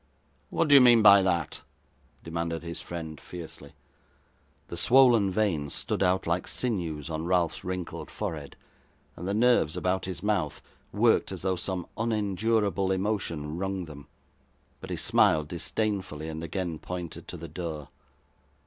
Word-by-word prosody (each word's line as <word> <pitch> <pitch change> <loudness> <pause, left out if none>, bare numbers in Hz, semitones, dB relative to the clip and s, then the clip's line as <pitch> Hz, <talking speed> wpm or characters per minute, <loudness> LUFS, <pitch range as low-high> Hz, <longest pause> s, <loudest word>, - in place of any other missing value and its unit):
'What 165 - +1
do 145 - +5
you 140 - +10
mean 120 -3 +7
by 100 -1 +9
that?' 85 -5 -1 0.6
demanded 85 0 -3
his 85 0 -5
friend, 80 -3 -7
fiercely. 85 -3 -9 0.9
The - - -6
swoln 120 +2 +5
veins 90 -8 0
stood - - -2
out 95 0 +2
like 85 +2 -1
sinews 85 - -2
on 80 0 -3
Ralph's 90 -2 +1
wrinkled 90 -2 -5
forehead, 75 -3 -5 0.6
and 90 - -6
the 100 - 0
nerves 115 -9 +3
about 95 +1 0
his 90 -1 -6
mouth 100 -8 0 0.3
worked - - +3
as - - -6
though 95 -1 +1
some 90 -1 -4
unendurable 105 -2 0
emotion 95 -6 -2
wrung 95 -1 -2
them; 70 -3 -11 0.7
but - - -9
he - - -2
smiled 75 -1 +3
disdainfully, 95 -4 -2
and 80 +1 -5
again 85 -2 -3
pointed 90 -2 -6
to - - -6
the - - -8
door. 80 -6 -6
90 Hz, 145 wpm, -28 LUFS, 80-100 Hz, 0.9 s, you